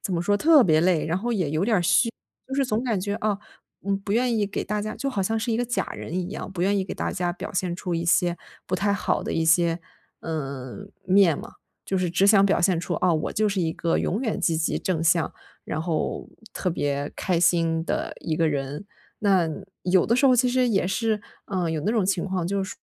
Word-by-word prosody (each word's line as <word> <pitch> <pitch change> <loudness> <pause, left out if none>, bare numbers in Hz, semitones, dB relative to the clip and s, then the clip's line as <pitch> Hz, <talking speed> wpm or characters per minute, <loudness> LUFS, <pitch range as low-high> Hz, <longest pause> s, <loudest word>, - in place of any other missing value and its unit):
怎 190 -6 -2
么 170 - 0
说， 205 +3 +2
特 300 +3 +6
别 155 -3 +4
累， 175 -2 +2
然 165 +3 0
后 240 +4 -3
也 180 -9 0
有 155 +4 0
点 220 -2 +2
儿 175 - +1
虚。 230 +6 +3 0.4
就 265 - -4
是 275 -1 +2
总 230 -1 -1
感 225 -6 0
觉， 200 +2 -2
啊， 215 -3 -1 0.5
嗯， 195 0 +1
不 200 +1 -4
愿 240 +1 +2
意 205 - +1
给 200 - -3
大 210 0 -2
家 215 +1 -4
就 275 -1 -3
好 200 - -1
像 220 +4 0
是 230 +1 -1
一 225 - 0
个 245 - +1
假 245 +1 -1
人 160 - -7
一 180 0 -2
样， 205 - -6
不 180 -2 -3
愿 200 +2 +2
意 - - +1
给 - - -6
大 - - -2
家 175 -1 -1
表 - - -7
现 180 -2 -1
出 180 -2 -3
一 165 - -1
些 175 0 +2 0.3
不 - - -1
太 200 +2 +1
好 - - -1
的 - - -3
一 165 - +1
些， 170 +1 +3 0.4
呃， 140 +2 -5 0.2
面 185 -4 +4
嘛。 - - -9 0.3
就 190 - -1
是 180 -1 0
只 190 +3 +3
想 200 -1 +6
表 195 - +2
现 175 -3 +2
出： - - -3
“啊， 180 -2 +4
我 155 - -1
就 215 0 +1
是 195 -2 -1
一 160 -1 0
个 165 - 0
永 205 +7 -1
远 225 -5 -1
积 165 -2 +1
极 160 - 0
正 165 -3 -1
向， 165 0 +3 0.3
然 155 - -3
后 165 -2 -2 0.3
特 180 - -1
别 145 -3 -2
开 180 -3 0
心 165 -2 +2
的 - - -2
一 160 - -2
个 165 -1 +2
人。” 145 +5 -3 0.3
那 190 -5 +3 0.4
有 185 0 +3
的 235 - +2
时 275 - +2
候， 255 - +6
其 250 +1 +3
实 255 0 +2
也 195 -5 +1
是， 215 +2 0 0.3
嗯， 180 -4 -1
有 155 -2 -2
那 215 - +1
种 220 -5 +2
情 190 -3 0
况， 185 -3 -2
就 200 +1 -1
是 - - -7
说， - - -16
185 Hz, 270 characters per minute, -25 LUFS, 170-210 Hz, 0.5 s, 特